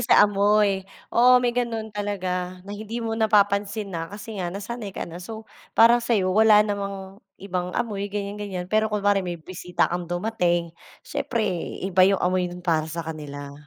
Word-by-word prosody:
sa - - +6
amoy. 205 -1 +3 0.3
Oo 250 +2 +6
may 240 - +2
gano'n 230 -3 -2
talaga 185 -3 -3
na 200 - -8
hindi 220 +3 -5
mo 225 - -2
napapansin 205 -2 +1
na 165 -1 -4
kasi 205 0 -7
nga 175 - -2
nasanay 205 +2 -6
ka - - -2
na. 170 +1 -9
So 220 +4 -8 0.3
parang 235 +1 +7
sa'yo 210 -6 +1
wala 215 0 +6
namang 200 -1 -5 0.2
ibang 180 -2 -3
amoy, 205 -4 -2
ganiyan, 205 0 -4
ganiyan. 190 -3 -4
Pero 215 +4 +1
kunwari 205 -1 +2
may 175 -2 -4
bisita 180 +1 -2
kang 175 -1 -3
dumating, 175 -3 0 0.3
siyempre 230 -3 -2 0.4
iba 190 -1 +1
'yong 195 +1 +6
amoy 180 0 +1
no'n 180 0 -10
para 160 -3 +1
sa 165 0 -5
kanila. 145 -3 -7
200 Hz, 170 wpm, -24 LUFS, 180-215 Hz, 0.4 s, parang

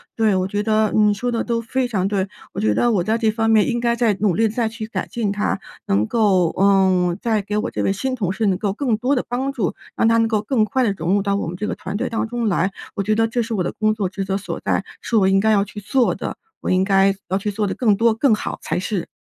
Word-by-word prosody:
对， 220 -3 +2
我 185 0 0
觉 205 +1 -2
得 215 -1 +2
你 210 -1 +4
说 245 +5 -2
得 230 - -1
都 235 -1 -1
非 250 +2 -1
常 195 -5 0
对。 195 -1 -1 0.3
我 - - -4
觉 215 - +2
得 240 - +2
我 185 -4 +1
在 220 +4 +1
这 225 -2 +1
方 225 +1 0
面 220 -2 +4
应 240 -1 0
该 235 0 +1
再 230 -3 +2
努 205 -4 +3
力 225 +4 +3
再 225 +1 -1
去 220 -1 -6
改 - - -4
进 220 -4 -2
它， 205 +1 -1 0.3
能 100 +2 +2
够， 190 -7 +2
嗯， 190 -3 +3
再 220 -3 +1
给 205 +1 -3
我 215 +4 -2
这 - - -3
位 195 - +1
新 260 +6 -2
同 195 -7 -1
事 220 +3 -1
能 190 -2 +2
够 200 0 -1
更 235 -1 0
多 255 +6 +1
的 250 - 0
帮 260 +3 -1
助， 220 -10 -1 0.2
让 - - +2
她 230 0 +4
能 225 0 +3
够 220 -2 0
更 220 0 +1
快 260 +3 0
地 220 - +2
融 170 +3 0
入 200 - +3
到 200 0 0
我 200 - -3
们 170 - -5
这 210 +4 -3
个 - - -2
团 - - -6
队 250 +4 -2
当 225 -1 -2
中 240 0 -2
来。 185 0 +1 0.2
我 200 - -1
觉 215 +2 +1
得 225 +1 +2
这 240 +2 -1
是 230 0 -3
我 190 -4 0
的 - - -2
工 215 0 +1
作 205 -4 -2
职 195 +1 -4
责 195 +1 -1
所 200 - -5
在， - - 0 0.2
是 235 - -2
我 200 -3 +4
应 195 0 +4
该 220 +2 +3
要 200 -2 +4
去 210 +1 -8
做 240 +5 +1
的， - - -5 0.3
我 - - -3
应 185 0 +3
该 195 0 +3
要 190 - +1
去 205 +1 -3
做 210 +1 -1
得 - - -2
更 220 -5 +2
多， 230 +2 +3
更 225 +1 +3
好 - - -5
才 - - -2
是。 185 -2 -3
215 Hz, 310 characters per minute, -21 LUFS, 195-230 Hz, 0.3 s, 你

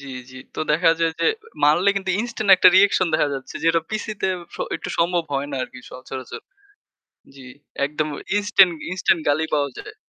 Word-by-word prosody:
জ্বি, 140 -1 -10 0.2
জ্বি। 130 - -11 0.2
তো - - -4
দেখা 165 +2 +4
যায় 165 -1 +1
যে - - +2 0.4
মারলে 175 +7 +4
কিন্তু 190 -1 -2
ইনস্ট্যান্ট 230 -3 -2
একটা 185 - +6
রিঅ্যাকশন 190 -1 +4
দেখা 150 - +2
যাচ্ছে 135 - -8
যেটা 165 0 +3
পিসিতে 215 -2 -3 0.3
স - - -9 0.2
একটু - - -8
সম্ভব 170 +1 +1
হয় 140 +1 -2
না 135 - -4
আরকি 125 - -9
সচরাচর। 130 0 -8 0.9
জ্বি। 135 -2 -13 0.4
একদম 150 +1 -3 0.3
ইনস্ট্যান্ট 195 -3 +4 0.2
ইনস্ট্যান্ট 185 -2 +1
গালি 155 +2 +2
পাওয়া 140 -2 0
যায়। - - -10
165 Hz, 175 wpm, -22 LUFS, 140-190 Hz, 0.9 s, একটা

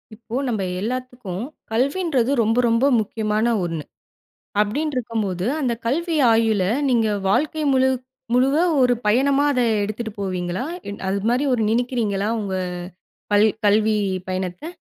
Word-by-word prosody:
இப்போ 230 +1 -8
நம்ம 220 -5 -1 0.2
எல்லாத்துக்கும் 245 -4 -4 0.3
கல்வின்றது 275 +1 +1
ரொம்ப 225 +2 +1
ரொம்ப 230 +3 +3
முக்கியமான 215 0 -1 0.2
ஒண்ணு, 165 -3 -4 0.8
அப்படின்று 285 +8 -1
இருக்கும்போது, 210 -7 -2
அந்த 255 -5 0
கல்வி 330 +7 0 0.2
ஆயுளை 220 -4 +2 0.2
நீங்க 230 -3 +2 0.2
வாழ்க்கை 305 +8 +1
முழு 260 0 +4 0.4
முழுவ 260 +3 +3 0.3
ஒரு 250 -1 +4
பயணமா 275 +6 +3
அதை 250 -3 +2 0.2
எடுத்துட்டு 215 +2 -4
போவீங்களா? 180 +2 -2 0.2
இல் 200 - -7
அது 200 +1 0
மாரி 250 +4 +1
ஒரு 230 - +1
நினைக்கிறீங்களா 225 -4 0
உங்க 195 -3 -3 0.8
கல் 205 +1 +6 0.2
கல்வி 215 +1 +3 0.3
பயணத்தை? 185 - -4
225 Hz, 125 wpm, -22 LUFS, 205-255 Hz, 0.8 s, கல்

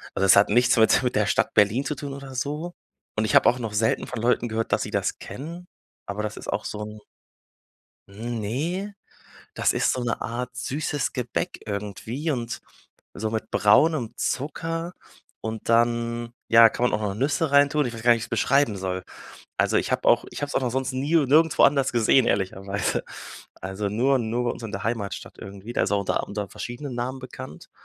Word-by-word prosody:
Also 95 - +2
es 95 - +7
hat 100 0 +5
nichts 120 +4 +4
mit 110 +3 +5
mit 125 - 0
der 105 - +3
Stadt - - +1
Berlin 105 +6 +3
zu 150 - -2
tun 140 -1 -6
oder 135 -1 -9
so. 150 +7 -3 0.4
Und 110 - +2
ich - - 0
habe - - +7
auch 125 - -1
noch 110 -3 -4
selten 110 +2 +1
von 110 - -5
Leuten 120 0 +2
gehört, 110 +1 -2
dass - - +2
sie - - -6
das - - -1
kennen, 170 +6 -8 0.4
aber 105 +1 -4
das 105 - -4
ist - - -9
auch - - -3
so 105 - -5
'n 105 0 -8 1.1
Ne, 120 - -3 0.6
das - - +2
ist - - +1
so 130 - -3
'ne 120 - -1
Art 125 +1 -3
süßes 145 +1 -2
Gebäck 125 +8 -3
irgendwie 105 - -3
und 120 -4 -3 0.5
so 110 +1 -3
mit 110 0 -4
braunem 115 +4 +3
Zucker 165 +5 -2 0.5
und 110 +1 -5
dann, 115 0 +1
ja, 115 0 +8
kann 120 +2 0
man - - 0
auch - - -4
noch 100 -2 -1
Nüsse 140 +6 0
reintun. 145 0 +4
Ich 120 - -3
weiß 115 - -7
gar 120 +1 +5
nicht, - - +7
wie 115 - -5
ich's 115 - -8
beschreiben 125 -1 +2
soll. 95 -1 -3 0.5
Also - - +2
ich - - -1
habe - - 0
auch - - +5
ich - - -6
habe 145 - -2
es - - -6
auch - - +1
noch 125 - 0
sonst 130 +2 -2
nie 140 +5 0
und 145 -6 +3
nirgendwo 160 +2 +5
anders 140 -1 +4
gesehen, 120 +2 +4
ehrlicherweise. 100 0 -1 0.6
Also, 95 +2 -3
nur 130 +6 +2
nur 120 +1 -1
bei 120 - +1
uns - - -9
in 110 -2 -6
der 95 - -5
Heimatstadt 110 -3 -4
irgendwie. 100 +4 -9
Da - - +1
ist 95 - 0
auch 100 -1 +2
unter 95 - 0
unter 105 -1 -4
verschiedenen 125 +6 -6
Namen 125 +2 -3
bekannt, 130 0 -10
120 Hz, 205 wpm, -25 LUFS, 105-140 Hz, 1.1 s, ja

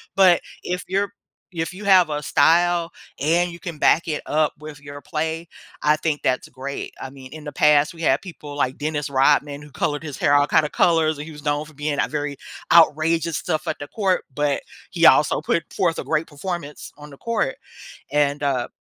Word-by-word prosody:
but 185 -3 +6 0.2
if 180 0 -3
you're 195 +1 0 0.4
if 165 +1 -3
you 200 +3 -9
have 185 -4 +5
a 150 0 -3
style 170 +3 +3 0.3
and 170 +5 +1
you 170 - -10
can 170 -5 -7
back 165 +3 +3
it 150 -2 -2
up 155 0 +1
with 150 -2 -10
your 145 0 -10
play, 160 0 -3 0.3
I 150 0 +4
think 155 -2 -2
that's 130 - 0
great. 135 +2 -6
I 135 - -5
mean, 130 0 -12
in 155 -1 -9
the 150 - -6
past, 150 +1 +3
we 165 - -11
had 135 -1 +3
people 150 -6 -10
like 130 -2 -1
Dennis 150 -1 -3
Rodman 140 +1 +2
who 150 - -13
colored 145 +1 -2
his 150 -5 -7
hair 145 - +2
all 145 0 +4
kinda 150 0 +3
colors, 160 -2 +2
and 145 - -6
he 160 - -9
was 150 -1 -12
known 145 +1 -1
for 155 - -15
being 145 0 -3
a - - +2
very 145 -2 -4 0.3
outrageous 165 0 +4
stuff 155 +1 -2
at - - -2
the 145 - -8
court, 195 -4 0
but 145 0 0 0.3
he 170 -2 +2
also 150 +2 +5
put 165 +2 0
forth 170 -3 0
a - - -5
great 160 0 0
performance 155 -1 -6
on 150 0 -11
the 140 - -13
court, 225 -11 -2 0.5
and 145 -1 +1
uh, 130 -4 0
150 Hz, 205 wpm, -22 LUFS, 145-170 Hz, 0.5 s, but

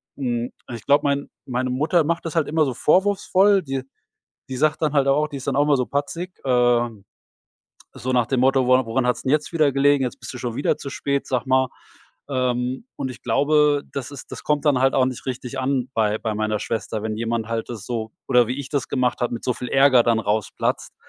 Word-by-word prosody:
Mhm, 120 -3 -2 0.2
ich 115 -2 -7
glaube, 145 +1 +4
mein 140 0 0 0.2
meine 130 0 -2
Mutter 155 +7 +2
macht 170 +3 -2
das 165 - -4
halt 160 -4 +2
immer 155 0 +2
so 130 - -2
vorwurfsvoll. 195 - +3
Die, 135 -2 -3 0.7
die 130 - -4
sagt 155 +3 +1
dann 155 -1 +1
halt 140 -2 +3
auch 145 +2 +3
die 145 -2 -7
ist 135 - -9
dann - - 0
auch 145 - +4
immer 145 -1 +3
so 125 - -1
patzig, 165 +6 -3
ähm, 120 -4 +2 0.9
so 130 +2 -3
nach 125 -2 +2
dem 130 +2 0
Motto: 130 0 +3
„Wora 130 -1 +4
woran 125 +3 0
hat's 120 -2 0
denn 130 - 0
jetzt 150 +2 0
wieder 155 -4 +3
gelegen? 140 0 +3
Jetzt 125 - -5
bist - - -7
du - - -6
schon 120 -2 -4
wieder 145 - +1
zu 140 - -7
spät, 140 0 -2
sag 130 0 -1
mal.“ 130 0 +3 0.6
Ähm, 125 - -1
und 130 - -3
ich 125 - -10
glaube, 145 +3 +3
das 140 -1 -5
ist 140 - -10
das - - -8
kommt 150 0 0
dann 145 -4 +3
halt 135 0 +3
auch 130 - +4
nicht 130 0 -5
richtig 130 0 -5
an 130 -1 -1
bei 110 -1 +1
bei 110 -2 -3
meiner 110 0 -1
Schwester, 110 -1 -3
wenn 110 0 -3
jemand 115 0 -2
halt 115 -1 -3
das 110 -4 -7
so 110 -2 -4 0.2
oder 125 -2 +5
wie 125 - -2
ich 140 -1 -6
das 140 -2 -1
gemacht 125 -2 0
habe, 120 -1 -1
mit 115 - -6
so 125 - +1
viel 125 - -6
Ärger 135 -2 +5
dann 115 -1 +2
rausplatzt. 105 -1 -2
130 Hz, 230 wpm, -22 LUFS, 120-145 Hz, 0.9 s, oder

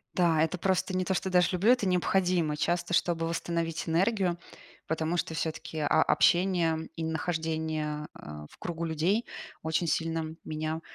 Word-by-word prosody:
Да, 165 -3 +3
это 165 +3 -1
просто 190 +1 0
не 185 0 0
то, 190 - 0
что 190 +1 -1
даже 180 -1 +4
люблю, 200 +7 +4
это 245 -6 +3
необходимо 180 -3 +1
часто, 175 +3 0
чтобы 165 -1 +1
восстановить 165 -1 -2
энергию, 180 +1 +1 0.5
потому 160 +2 -1
что 165 - -1
всё-таки, 160 0 -4
а, 145 - +1 0.2
общение 170 -3 +2
и 165 - -3
нахождение, 160 -2 -2
э, 75 0 -8
в - - -18
кругу 170 -1 -4
людей 170 +8 +1 0.4
очень 160 +2 0
сильно 160 0 -1
меня 155 +1 -3
165 Hz, 155 wpm, -29 LUFS, 160-180 Hz, 0.5 s, даже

